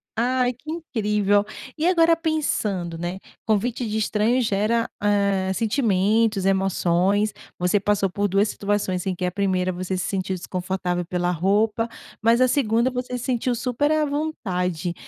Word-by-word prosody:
Ai, 250 +2 +1
que 290 +6 -9
incrível. 210 - +1 0.3
E 315 +2 0
agora 335 -2 +5
pensando, 215 - -1
né, 175 +2 -3 0.3
convite 225 +3 0
de 215 - -1
estranho 220 +3 +1
gera, 220 +2 +1
hã, 200 -2 +1
sentimentos, 215 -1 +1
emoções, 195 +1 +2 0.2
você 180 +3 +2
passou 200 -1 +1
por 205 +2 0
duas 200 +2 +2
situações 200 -3 -2
em 185 - 0
que 180 - -3
a 180 - -1
primeira 185 -1 0
você 185 +1 -3
se 185 - -2
sentiu 190 -1 -2
desconfortável 180 0 -3
pela 180 +1 -1
roupa, 210 +6 +1 0.3
mas 230 +2 +4
a 255 - +6
segunda 240 -1 +2
você 250 0 -3
se 245 - -7
sentiu 250 -1 0
super 250 +5 0
à 310 -1 +2
vontade. 180 - -2
205 Hz, 150 wpm, -23 LUFS, 185-240 Hz, 0.3 s, a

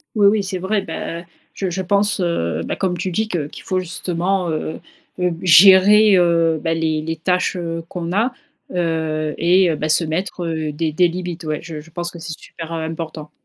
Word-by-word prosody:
Oui 205 -2 +4
oui, 205 +1 +4
c'est 190 -1 -4
vrai. 195 +2 -1
Bah, 170 -1 -5 0.3
je 190 -2 -2
je 190 +2 -3
pense, 200 +2 +1
heu 85 - -1
bah, - - -3
comme 180 -2 -1
tu 185 +2 -2
dis 220 +5 -1
que 165 -8 -2
qu'il - - -11
faut 185 -1 0
justement, 180 +1 -2
heu 155 0 -3 0.4
heu, 180 -1 +1
gérer, 195 +4 +7
heu 165 -2 +3
bah, 165 -1 0
les 160 -1 0
les 165 +1 -4
tâches, 180 +3 0
heu, 165 -1 -4
qu'on 175 -1 -4
a, 225 +6 +2 0.4
heu 160 -3 -1
et 175 0 +4
bah, 155 +1 -3
se 155 +2 +3
mettre, 175 +2 -3
heu, 160 -2 -2
des 155 +1 -2
des 175 +3 +3
limites. 175 -1 -5
Ouais, 155 -1 -2
je 160 -3 -7
je 165 - -16
pense 175 +1 -4
que 170 - -11
c'est 165 -1 -6
super, 165 0 -8
heu, 160 - -3
important. 160 -2 -6
170 Hz, 205 wpm, -20 LUFS, 160-185 Hz, 0.4 s, gérer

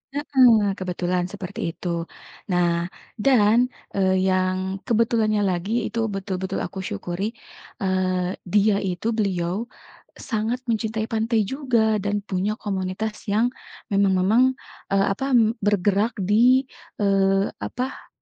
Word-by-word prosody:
Heeh, 245 -8 +4
kebetulan 180 -1 -1
seperti 195 -3 -7 0.2
itu. 180 - -7 0.6
Nah, 175 -1 +1 0.3
dan, 220 -2 +4 0.4
eee, 190 -1 +2
yang 185 +1 0
kebetulannya 225 -2 +2
lagi 180 +4 -2 0.2
itu 230 +2 -4
betul-betul 190 -1 -3
aku 190 - -6
syukuri, 190 - -4 0.5
eee, 185 -1 0 0.2
dia 205 +2 +3
itu 185 +2 -3
beliau, 190 +2 -1 0.5
sangat 225 +2 -2
mencintai 220 -1 -1
pantai 225 +1 +1
juga 230 -6 +1
dan 205 0 0
punya 200 +1 -1
komunitas 195 +2 -2 0.2
yang, 230 +4 +2 0.4
memang-memang, 200 +4 +3 0.5
eee, 195 0 +3
apa 265 - -4 0.4
bergerak 205 +2 +2 0.2
di, 250 +5 +5 0.4
eee, 195 0 +2
apa, 255 +2 -5
200 Hz, 110 wpm, -23 LUFS, 185-220 Hz, 0.6 s, di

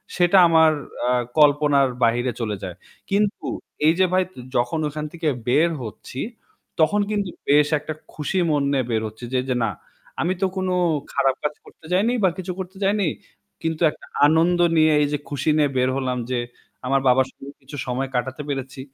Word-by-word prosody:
সেটা 175 +1 +4
আমার 160 -1 +5 0.4
আ - - +3 0.3
কল্পনার 145 -2 +4
বাহিরে 120 +2 +2
চলে 105 -2 -1
যায়। 90 -2 -5 0.3
কিন্তু 205 +1 0 0.4
এই 160 - +6
যে 185 - +6
ভাই 185 - +4 0.3
যখন 120 +6 +1
ওখান 150 +1 -5
থেকে 165 -1 -3 0.2
বের 150 +7 +4
হচ্ছি 115 +3 -8 0.6
তখন 200 +6 +3
কিন্তু 205 -3 -1 0.2
বেশ 145 +1 +5
একটা 150 +2 -5 0.2
খুশি 155 +5 -2
মন 145 -2 +2
নিয়ে 135 -2 +1
বের 110 -1 +1
হচ্ছি 110 +3 -10
যে, 130 - +3
যে 125 - +1
না, 110 - 0 0.5
আমি 175 +3 +1
তো 195 - +4
কোনো 185 -1 0 0.4
খারাপ 135 -1 +2
কাজ 150 0 0
করতে 160 - -17
যাইনি 215 +7 +2
বা 190 - +5
কিছু 185 0 -4
করতে 190 +1 -7
যাইনি। 200 -1 +2 0.5
কিন্তু 160 0 -2
একটা - - -15 0.2
আনন্দ 165 +3 +3 0.2
নিয়ে 155 0 +5
এই 145 - +2
যে - - +1
খুশি 145 +2 -1
নিয়ে 150 -2 +3
বের 125 0 +2
হলাম 130 -2 -1
যে 125 - +1 0.5
আমার 135 +1 +2
বাবার 130 +1 +4
সঙ্গে 140 +1 -12
কিছু 140 +2 -10
সময় 130 +2 -2
কাটাতে 130 +3 -2
পেরেছি। 135 -1 -4
150 Hz, 180 wpm, -22 LUFS, 130-170 Hz, 0.6 s, এই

